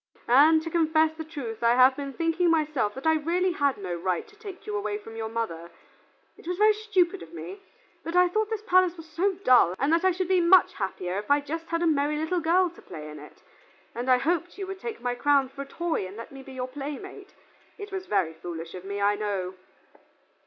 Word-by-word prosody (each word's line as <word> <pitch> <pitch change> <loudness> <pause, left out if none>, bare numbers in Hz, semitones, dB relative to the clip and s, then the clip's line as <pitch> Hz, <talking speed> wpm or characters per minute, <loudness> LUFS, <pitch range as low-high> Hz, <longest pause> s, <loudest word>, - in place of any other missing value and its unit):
And 310 +6 +6
to 330 - -5
confess 315 -1 +2
the 320 - -6
truth 280 -9 -7
I 235 0 +4
have 255 +1 +6
been 280 -1 -6
thinking 335 +2 +1
myself 300 -10 +1
that 265 - -8
I 320 - +5
really 350 +4 0
had 285 -5 0
no 185 -3 -5
right 175 +1 -2
to 420 - -20
take 410 -3 -10
you 210 - -4
away 205 0 -2
from 225 +2 -11
your 225 -1 -4
mother. 170 -8 -4 0.7
It - - -15
was 360 0 -2
very 425 +1 +5
stupid 415 - 0
of 165 0 -11
me, 170 +4 -8 0.4
but 335 - -5
I 360 0 +6
thought 430 +4 -1
this 440 -1 -3
palace 365 -3 +3
was 325 0 -11
so 345 +6 0
dull, 245 - +5
and 280 +4 +1
that 335 +2 +2
I 375 - +5
should 370 0 -1
be 370 -1 +3
much 350 +1 +5
happier 190 -2 -3
if 210 - -9
I 285 0 +5
just 325 +3 -6
had 335 +1 -1
a - - +2
merry 300 -1 +1
little 320 +4 -1
girl 345 +2 +2
to 345 - -16
play 150 -1 -9
in 150 - -10
it, 150 - -15 0.5
and 245 +2 -4
I 255 - +6
hoped 340 +6 -1
you 395 - -4
would 385 0 -7
take 460 - -6
my 245 0 -1
crown 275 +1 +2
for 275 - -8
a - - -5
toy 335 - -2
and 195 +3 -11
let 230 - -9
me 270 0 -10
be 265 0 -12
your 255 -1 -4
playmate. 295 +9 -8 0.4
It 410 -1 -8
was 380 -1 -5
very 190 -6 +1
foolish 165 0 -7
of 180 - -8
me, 200 +1 -5
I 205 +1 +3
know." 200 -3 -3
290 Hz, 235 wpm, -26 LUFS, 215-350 Hz, 0.7 s, And